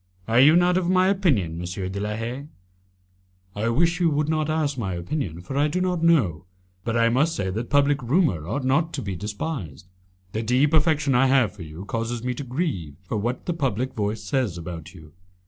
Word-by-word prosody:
Are 115 +2 +3
you 145 +5 +7
not 175 +1 +4
of 180 -2 0
my 185 0 +4
opinion, 130 - +1
M. 90 +2 -4
de 100 - -4
la 105 +1 -2
Haye?" 120 +6 -5 1.1
"I 110 +3 0
wish 165 +8 +2
you 170 -2 +3
would 150 0 0
not 155 -1 0
ask 155 -3 0
my 100 -7 -3
opinion, 85 - -4
for 95 +10 -7
I 145 +2 +3
do 165 +5 -1
not 180 -2 0
know. 105 - +3 0.4
But 115 0 -1
I 115 0 +4
must 150 +7 +2
say 95 -10 -2
that 115 +5 -4
public 145 0 +3
rumour 125 - +1
ought 130 +8 -2
not 155 +5 +1
to 135 - -3
be 100 -2 -4
despised. 105 - -5 0.5
The 110 - -2
deep 130 +7 +2
affection 155 -2 +3
I 135 +2 +4
have 130 -5 +3
for 100 - -12
you 80 +4 -8
causes 115 +2 -3
me 125 0 -1
to 135 - -6
grieve 125 - -3
for 95 - -3
what 120 +5 -2
the 175 - -1
public 130 -5 -1
voice 105 0 -2
says 100 -3 -1
about 85 +2 -8
you." 80 -3 -14
125 Hz, 210 wpm, -24 LUFS, 100-150 Hz, 1.1 s, you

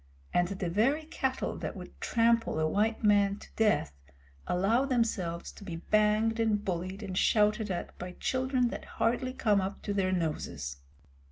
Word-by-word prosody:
The 180 +1 0
very 235 - +2
cattle 265 -4 -2
that - - -5
would - - -11
trample 230 -6 +2
a 155 - +2
white 220 +7 0
man 205 -1 +4
to - - -13
death 210 - +2 0.5
allow 205 +8 +2
themselves 225 -10 -1
to - - -13
be 180 -4 -5
banged 215 +5 +2
and 215 -2 +1
bullied 185 +3 -3
and 190 -2 -5
shouted 210 +2 +3
at 180 -2 -4
by 180 0 -6
children 255 +2 0
that - - -6
hardly 240 +3 +1
come 210 -6 +2
up 190 +1 -5
to 205 - -2
their 190 -2 +1
noses. 150 - -2
210 Hz, 160 wpm, -30 LUFS, 185-230 Hz, 0.5 s, man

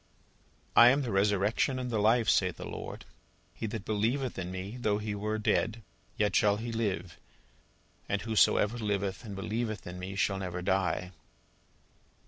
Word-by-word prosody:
"I 120 - +9
am 140 +3 +2
the 120 - -3
Resurrection 100 +6 +2
and 125 -1 -3
the 110 - 0
Life, 110 +2 +3
saith 90 -4 +2
the - - -7
Lord: - - -7 0.5
he 110 - -4
that 105 -1 -5
believeth 115 +3 -1
in 90 -1 -4
me, 95 +5 -6
though 105 -4 +1
he 105 0 -3
were 105 +1 -2
dead, 110 +1 0 0.3
yet 105 -2 +1
shall 105 -2 +4
he 115 +2 -4
live: 95 -7 -2 0.9
and 100 - +1
whosoever 110 +1 +3
liveth 100 -1 -2
and 105 -4 -7
believeth 110 +2 -3
in 90 0 -7
me 95 +2 -6
shall 95 0 +1
never 90 -1 -4
die." 90 -1 0
105 Hz, 160 wpm, -30 LUFS, 95-115 Hz, 0.9 s, I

